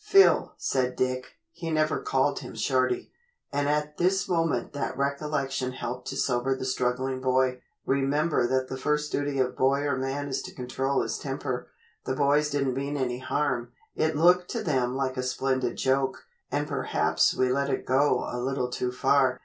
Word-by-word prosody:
"Phil," 395 -2 +5
said 125 -1 0
Dick 130 0 -1 0.2
he 170 0 -6
never 155 -1 +1
called 425 0 +1
him - - -9
Shorty, 370 0 0 0.4
and 145 0 +1
at 150 0 -1
this 185 +2 +2
moment 165 -9 0
that 145 - -3
recollection 140 -2 -1
helped 125 -1 -5
to 135 - -4
sober 130 0 +1
the 130 - -4
struggling 130 +1 -1
boy 130 -1 +2 0.2
"remember 140 +1 +2
that 130 +1 0
the 130 - -5
first 150 +1 0
duty 145 -1 -1
of 125 -1 +1
boy 135 +2 +2
or 145 -1 0
man 135 +2 -2
is 135 - -2
to - - -9
control 135 +2 -1
his - - -3
temper. - - -4 0.4
The 130 - -1
boys 145 +1 +3
didn't 140 -3 0
mean 140 +2 -2
any 125 -2 -1
harm. 125 -3 -1 0.2
It 155 -1 +1
looked 180 +2 +4
to 230 -2 -2
them 130 -7 0
like 130 -1 -1
a - - 0
splendid 130 0 -1
joke, 135 0 0 0.3
and 145 +1 0
perhaps 80 - +1
we 130 0 +2
let 140 +2 +1
it 130 - -1
go 130 0 +2
a 125 - -4
little 125 0 -1
too 125 0 -1
far. 130 0 +2
135 Hz, 180 wpm, -27 LUFS, 130-145 Hz, 0.4 s, Phil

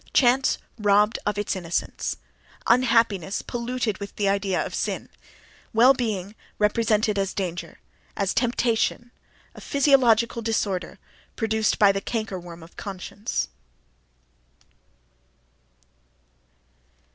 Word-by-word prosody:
Chance 255 +1 +4 0.2
robbed 210 +1 +3
of 210 -1 0
its 205 0 -1
innocence; 170 -2 -3 0.5
unhappiness 230 -6 +2
polluted 240 -4 -2
with 200 0 -7
the 205 - 0
idea 195 -1 +1
of - - -7
"sin"; - - -3 0.6
well 240 +4 +7
being 210 -6 -3 0.2
represented 210 -1 +2
as 195 0 -1
a - - -27
danger, 175 -3 -4 0.4
as 195 -2 +1
a - - -2
"temptation"; 240 0 0 0.4
a - - -12
physiological 245 -5 +3
disorder 210 -5 -2 0.4
produced 220 -1 +1
by 205 -2 +6
the 195 0 -2
canker 215 -4 -3
worm 170 -1 -11
of 165 - -16
conscience.... 200 - -4
210 Hz, 110 wpm, -25 LUFS, 195-235 Hz, 0.6 s, well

